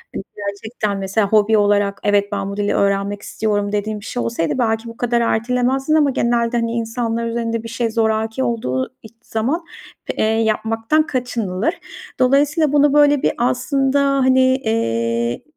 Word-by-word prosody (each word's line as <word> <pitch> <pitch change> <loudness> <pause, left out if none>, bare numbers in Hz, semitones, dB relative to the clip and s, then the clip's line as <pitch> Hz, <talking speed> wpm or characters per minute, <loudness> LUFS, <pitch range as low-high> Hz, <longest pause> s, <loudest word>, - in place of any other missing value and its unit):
Hani, - - -4
gerçekten, 205 +1 -4
mesela, 195 +2 0
hobi 215 +1 +4
olarak, 205 -1 +2
evet, 205 0 +2
ben 200 -1 -2
bu 200 - -7
dili 205 0 0
öğrenmek 200 0 0
istiyorum 205 -2 -2
dediğin 210 +1 -2
bir 205 - -12
şey 245 - -3
olsaydı, 165 -8 -1
belki 225 -1 0
bu 230 - -11
kadar 240 -1 +1
ertelemezdin 250 +5 0
ama 300 -2 +4
genelde, 235 -1 0
hani, 230 -1 -1
insanlar 230 0 -2
üzerinde 230 -1 -2
bir 230 - -6
şey 230 0 -2
zoraki 220 +2 0
olduğu 130 - -2
iç 220 0 -14
zaman, 270 +10 -2 0.5
eee, - - +1
yapmaktan 225 +6 +1
kaçınılır. 240 - -2 0.5
Dolayısıyla 285 +4 +3
bunu 290 0 +4
böyle 290 -1 +4
bir - - +2
aslında, 265 +3 +1
hani, 260 -1 +3
eee, 120 - 0
225 Hz, 155 wpm, -19 LUFS, 205-250 Hz, 0.5 s, hobi